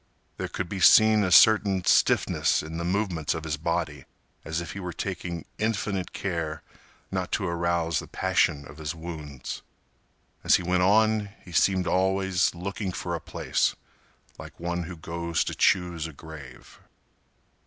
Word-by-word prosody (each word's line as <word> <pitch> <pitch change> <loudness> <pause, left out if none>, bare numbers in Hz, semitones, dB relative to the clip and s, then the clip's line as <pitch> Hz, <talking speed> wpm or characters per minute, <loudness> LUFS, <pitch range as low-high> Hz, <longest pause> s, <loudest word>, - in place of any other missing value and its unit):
There - - -3
could 95 - -4
be 95 +2 -5
seen 110 +3 +7
a 95 - +1
certain 100 -1 +6
stiffness - - +3
in 80 +1 -6
the 85 - -3
movements 90 -4 -1
of 80 - -5
his 75 -1 -2
body, 80 -3 -2 0.4
as 80 +1 -3
if 85 - -6
he 100 - -7
were 90 -2 -5
taking 85 -2 -5
infinite 105 -3 -1
care 80 -5 -3 0.5
not 95 -1 -2
to 100 - 0
arouse 85 -1 0
the - - -8
passion 70 -1 +1
of 75 - -13
his 80 +2 -4
wounds. 75 -5 -7 0.8
As - - +5
he - - 0
went 90 +1 +1
on, 105 +2 +3 0.2
he 90 - -11
seemed 95 +2 +2
always 95 0 +1
looking 95 +2 -4
for 85 0 -4
a 85 - -3
place, - - -1 0.6
like - - -11
one 85 0 -2
who 90 0 -8
goes 85 +1 -2
to - - -4
choose 85 -3 +1
a 80 - -10
grave. 70 -4 -12
85 Hz, 160 wpm, -26 LUFS, 80-95 Hz, 0.8 s, seen